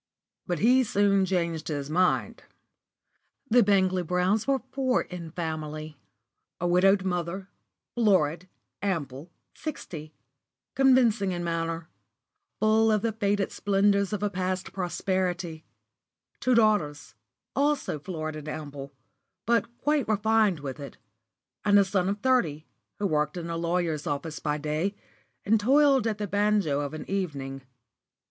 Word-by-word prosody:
But 175 - -1
he 250 +8 +4
soon 200 -3 +2
changed 170 -4 -1
his 145 -3 -3
mind. 180 +4 +1 1.1
The 245 +1 +7
Bangley 190 -3 +3
Browns 180 +5 0
were 275 -1 +3
four 265 -2 +1
in 175 -2 -8
family: 155 -2 -5 0.6
a 175 - 0
widowed 190 +2 +4
mother, 180 +1 -3 0.4
florid, 185 -6 +2 0.3
ample, 160 -6 -3 0.2
sixty, 160 - -7 0.6
convincing 240 -7 +4
in 175 0 -3
manner, 165 -1 -2 0.7
full 220 +1 +4
of 210 -1 +1
the 230 - +1
faded 205 -2 0
splendours 200 0 +2
of 210 -1 -2
a 205 - +1
past 185 -1 -3
prosperity; 180 -2 -2 0.7
two 255 -1 +2
daughters, 210 -10 +2 0.4
also 280 - 0
florid 155 -1 -5
and 155 0 -8
ample, 145 -3 -7 0.5
but 235 +1 +2
quite 295 -2 +1
refined 215 -5 +2
with 135 0 -6
it; 140 -1 -9 0.7
and 205 -1 +5
a 200 - +5
son 190 -1 0
of 200 +1 -3
thirty, 165 - +1 0.3
who 205 - -2
worked 150 -2 0
in 170 -1 -5
a - - -2
lawyer's 165 -2 -1
office 150 +2 -3
by 150 -1 -1
day, 155 +7 -2 0.5
and 220 +2 +4
toiled 270 +2 +4
at 215 -2 -1
the 210 - -2
banjo 205 -7 +1
of 145 +2 -4
an 155 - -7
evening. 140 -9 -3
185 Hz, 135 wpm, -27 LUFS, 155-210 Hz, 1.1 s, The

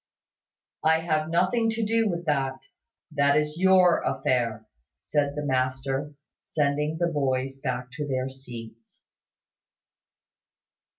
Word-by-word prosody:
"I 160 +1 +4
have 155 -1 0
nothing 185 +7 +2
to 225 0 -1
do 225 0 +2
with 170 -1 -3
that. 135 -3 0 0.5
That 140 -1 +3
is 150 +1 -1
your 185 -2 +5
affair," 115 -3 0 0.3
said 145 -1 -1
the 150 0 -3
master, 135 +2 -1 0.3
sending 150 +1 0
the 175 - +1
boys 135 -4 -1
back 125 -2 -3
to 150 -1 -3
their 130 -1 -1
seats. 115 -4 -11
145 Hz, 115 wpm, -26 LUFS, 130-165 Hz, 0.5 s, your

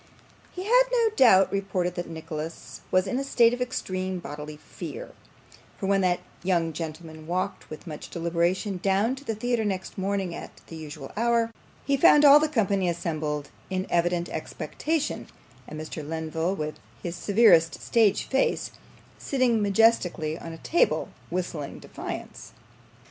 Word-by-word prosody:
He 365 - -6
had - - +5
no 470 -2 +3
doubt 195 - +6
reported 190 -3 -1
that 175 -1 -5
Nicholas 160 0 -7
was 185 0 +3
in 225 +7 -1
a - - -1
state 240 -3 +4
of 245 - -4
extreme 185 -6 -2
bodily 150 -2 -7
fear; - - -8 0.7
for - - -4
when 195 0 +3
that 180 -1 +1 0.2
young 170 -3 +1
gentleman 160 0 -7
walked 185 +3 -3
with 155 - -9
much 155 -4 -8
deliberation 170 +3 -1
down 200 +5 +2
to 275 - -12
the 225 -6 -3
theatre 240 +1 0
next 190 -2 -3
morning 190 -2 -1
at - - -9
the 165 - -10
usual 150 -3 -8
hour, 230 +1 +2 0.3
he 280 0 +2
found 295 +2 +7
all 285 +1 +10
the 310 0 +1
company 200 - +1
assembled 155 -4 -3 0.2
in 185 0 -1
evident 175 0 +1
expectation, 285 - -3 0.4
and 155 - -7
Mr. 155 0 -6
Lenville, 160 +3 -2
with 155 -3 -4 0.2
his 175 -1 -3
severest 195 -3 +4
stage 225 -4 +3
face, 265 - 0 0.5
sitting 250 -5 +1
majestically 195 -6 +2
on 165 0 -8
a 165 - -8
table, 340 - +1 0.2
whistling 170 -5 -4
defiance. - - -8
185 Hz, 150 wpm, -26 LUFS, 165-225 Hz, 0.7 s, all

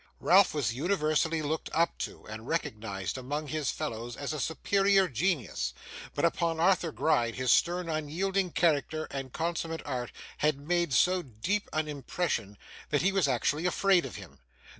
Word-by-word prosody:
Ralph 190 -2 +5
was 120 -7 0
universally 155 +1 +1
looked 155 +2 -2
up 165 +1 +1
to, - - -5
and 110 +2 -8
recognised 105 - -3
among 145 +4 -4
his 155 -2 -1
fellows 120 -5 -4
as 145 +1 -3
a 155 - -4
superior 195 +6 +2
genius, 125 - -1 0.4
but - - +2
upon 165 -1 0
Arthur 175 -1 +3
Gride 120 -7 +1
his 130 -1 +1
stern 175 0 +2
unyielding 175 +5 -1
character 155 -1 +1
and 135 -2 -5
consummate 165 +1 -3
art 125 -4 -3 0.3
had 150 -1 +2
made 170 +2 0
so 180 +10 +4
deep 170 - -2
an 155 0 -1
impression, 135 - -2 0.3
that 145 +1 +1
he 195 - +4
was 195 -6 +2
actually 145 +6 +1
afraid 185 -1 +3
of - - -7
him. - - -11
155 Hz, 160 wpm, -30 LUFS, 130-175 Hz, 0.4 s, Ralph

